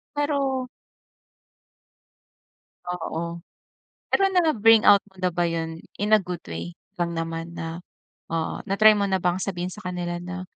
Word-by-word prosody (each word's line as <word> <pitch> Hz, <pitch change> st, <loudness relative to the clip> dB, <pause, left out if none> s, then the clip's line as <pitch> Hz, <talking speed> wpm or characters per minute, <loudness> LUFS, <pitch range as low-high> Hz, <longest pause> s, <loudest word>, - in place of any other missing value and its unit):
Pero 275 Hz, -3 st, 0 dB, 2.2 s
Oo. 170 Hz, -1 st, -4 dB, 0.7 s
Pero, 390 Hz, -, +3 dB
na-bring 225 Hz, -, +5 dB
out 200 Hz, -1 st, +7 dB
mo 190 Hz, -, -26 dB
na 180 Hz, -, +2 dB
ba 175 Hz, 0 st, 0 dB
'yon 165 Hz, -1 st, -3 dB, 0.2 s
in 210 Hz, +2 st, +3 dB
a 215 Hz, -, +5 dB
good 180 Hz, -2 st, -6 dB
way 85 Hz, +1 st, -5 dB, 0.2 s
lang 170 Hz, -1 st, -1 dB
naman 165 Hz, +1 st, -4 dB
na 165 Hz, +1 st, -5 dB, 0.5 s
ah, 165 Hz, -1 st, -2 dB
na-try 215 Hz, +2 st, +6 dB
mo 200 Hz, -1 st, +1 dB
na 190 Hz, -, +2 dB
bang 180 Hz, 0 st, +1 dB
sabihin 180 Hz, -1 st, -3 dB
sa 210 Hz, -, -11 dB
kanila 175 Hz, -1 st, -3 dB
na, 180 Hz, +1 st, -6 dB
180 Hz, 140 wpm, -25 LUFS, 170-210 Hz, 2.2 s, out